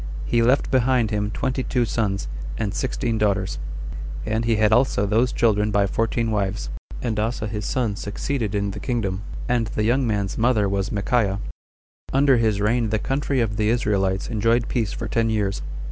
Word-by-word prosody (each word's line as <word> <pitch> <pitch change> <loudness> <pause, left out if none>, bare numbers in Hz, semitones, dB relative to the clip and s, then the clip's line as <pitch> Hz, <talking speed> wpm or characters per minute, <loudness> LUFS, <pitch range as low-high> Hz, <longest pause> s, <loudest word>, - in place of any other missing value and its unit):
He 120 - +2
left 125 +4 +3
behind 125 -3 +3
him 105 -1 0
twenty 130 +4 -1
two 125 -1 0
sons, 100 -4 -1 0.3
and 105 -3 -2
sixteen 120 -3 -1
daughters; 100 -2 0 0.7
and 110 +1 0
he 115 -1 +3
had 110 0 +3
also 120 -3 +3
those 115 +5 +2
children 105 -2 +2
by 100 -1 +3
fourteen 115 +2 0
wives; 100 -1 -1 0.3
and 110 -4 -1
Asa 110 0 -1
his 105 -1 -4
son 120 -6 0
succeeded 110 +1 -3
in 100 0 0
the - - -6
kingdom; 100 -7 -2 0.3
and 120 -2 +1
the 105 - -2
young 125 +3 +2
man's 100 -2 -1
mother 110 -3 +3
was 100 +1 -1
Michaiah. 100 -1 +1 0.7
Under 135 -1 +4
his 110 -3 +2
reign 115 +2 +1
the 110 - +1
country 135 +2 0
of 105 -3 -1
the 105 -1 +2
Israelites 100 -5 +1
enjoyed 115 +1 +1
peace 115 -5 0
for - - -4
ten 115 -1 +1
years. 100 -5 0
110 Hz, 175 wpm, -23 LUFS, 105-120 Hz, 0.7 s, Under